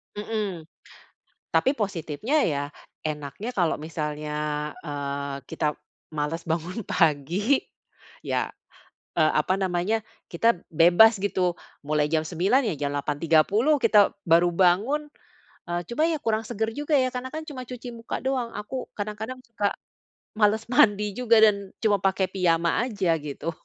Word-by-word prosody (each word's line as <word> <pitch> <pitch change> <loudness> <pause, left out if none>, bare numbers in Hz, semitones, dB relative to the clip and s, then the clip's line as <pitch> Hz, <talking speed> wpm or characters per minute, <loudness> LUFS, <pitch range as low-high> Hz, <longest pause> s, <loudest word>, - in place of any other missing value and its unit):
Mhm. 210 -5 -3 0.9
Tapi 265 - +3
positifnya 200 - -1
ya, 145 -2 -1 0.4
enaknya 150 - -4
kalau 175 -4 +1
misalnya, 150 -1 -3
eee, 140 -2 -4
kita 150 -1 -2 0.4
males 150 +3 -3
bangun 170 +6 -2
pagi, 175 - +2 0.7
ya, - - 0 0.7
eee, 155 -1 +4
apa 185 +1 0
namanya, 190 +4 0 0.3
kita 225 +5 +3 0.2
bebas, 175 +7 +6
gitu. 185 -3 +1 0.3
Mulai 150 0 +1
jam 155 0 +1
09:00 190 - +2
ya, 165 - -2
jam 140 - -1
8:30 165 - +2
kita 210 -3 +5
baru 170 +1 +5
bangun. 210 - +2 0.6
Eee, 175 0 -1
cuma 285 +7 +1
ya 320 -3 -1
kurang 225 0 0
segar 220 +2 -2
juga, 295 +1 -1
ya, 255 - +2
karena 255 +1 -5
kan 315 +1 -4
cuma 260 -4 -6
cuci 245 0 -7
muka 230 - -5
doang. 255 -3 -1
Aku 230 +5 -5
kadang-kadang 215 +5 -5
suka 215 -4 -1 0.7
males 210 +1 +3
mandi 210 -3 +4
juga 230 0 +3
dan 200 -2 +3
cuma 205 -3 +3
pakai 190 0 +2
piyama 170 -3 +2
aja, 195 -6 0
gitu. 150 +3 -4
195 Hz, 135 wpm, -25 LUFS, 160-225 Hz, 0.9 s, bebas